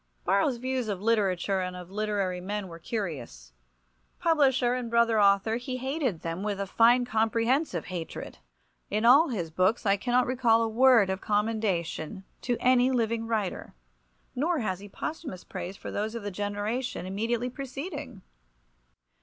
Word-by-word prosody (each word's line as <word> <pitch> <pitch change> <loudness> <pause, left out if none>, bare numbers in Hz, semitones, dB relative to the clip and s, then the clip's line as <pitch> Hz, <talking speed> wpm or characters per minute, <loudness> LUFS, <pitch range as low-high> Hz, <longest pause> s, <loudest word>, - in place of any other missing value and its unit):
Borrow's 200 +7 +2
views 255 -1 -2
of 200 -3 -2
literature 200 -3 +1
and 180 0 -3
of 180 0 -9
literary 200 -3 -1
men 205 +1 -4
were 165 -1 -10
curious. 140 - -5 0.7
Publisher 265 -6 +3
and 250 -2 -3
brother 230 -2 +3
author, 200 +3 +3
he 255 +1 -4
hated 260 - -2
them 165 +2 -4
with 205 -1 -2
a 200 - -1
fine 235 +5 +4
comprehensive 230 - +1
hatred. 170 - -6 0.5
In 215 +3 0
all 280 +8 +7
his 175 -10 -3
books 185 +8 +1
I 200 0 +3
cannot 245 +4 +2
recall 240 -3 +3
a - - +1
word 230 -3 +5
of 190 - -3
commendation 205 -5 -1 0.2
to 245 -1 -1
any 255 0 +4
living 230 -2 0
writer, 215 - -3 0.6
nor 325 +6 0
has 190 -4 -2
he 205 +1 -11
posthumous 280 - -6
praise 190 +3 -6
for - - -7
those 215 +2 -2
of 230 - -5
the 205 - -4
generation 205 +4 -3
immediately 230 +6 -2
preceding. 270 - -7
220 Hz, 155 wpm, -28 LUFS, 195-245 Hz, 0.7 s, all